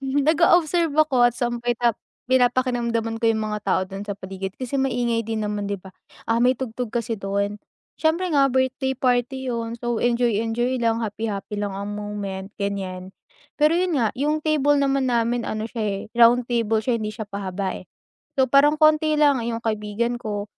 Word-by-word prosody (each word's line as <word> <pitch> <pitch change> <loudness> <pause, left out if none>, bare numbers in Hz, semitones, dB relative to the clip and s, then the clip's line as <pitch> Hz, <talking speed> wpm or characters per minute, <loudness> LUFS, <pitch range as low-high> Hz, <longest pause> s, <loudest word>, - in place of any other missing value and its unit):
nag-o-observe 315 +4 +3
ako 265 -6 +4
at 240 - -6 1.0
pina-pakiramdaman 245 -3 +1
ko - - -2
yung 220 -1 +2
mga 210 - -2
tao 190 - +2
dun 195 +2 -8
sa 205 - -3
paligid 190 0 -6
kasi 260 +2 -3
maingay 240 -3 0
din 225 -1 -2
naman 205 -1 -2
'di 200 - -2
ba, 190 - -11 0.4
ah, 230 - +3
may 250 +2 +4
tugtog 250 -1 -4
kasi 230 -2 -2
dun, 200 +1 -2 0.4
siyempre 335 +3 +1
nga 280 -2 +5
birthday 265 +1 0
party 255 +1 0
yun 230 -1 -3
so 240 -1 -2
enjoy-enjoy 240 +1 +1
lang 230 0 +1
happy-happy 210 -1 -4
lang 205 -1 -3
ang 200 +1 -4
moment 205 -2 -5
ganyan. 190 -2 -4 0.5
Pero 305 +2 +5
yun 360 0 +1
nga 230 -3 +2
yung 300 +4 +1
table 290 -2 +2
naman 275 -2 +1
namin 235 0 +1
ano 215 0 -3
siya, 230 -1 -4
eh, 200 -2 -2 0.2
round 240 +1 +5
table 230 -2 +1
siya 235 +2 0
hindi 215 - -2
siya 220 -1 -6
pahaba, 195 -1 -3
eh. - - -10 0.5
So 265 - +5
parang 290 +3 +5
konti 310 0 +4
lang 285 -5 +4
yung 230 -1 -2
kaibigan 220 +1 -2
ko, 210 -3 -4
235 Hz, 170 wpm, -23 LUFS, 210-265 Hz, 1.0 s, nga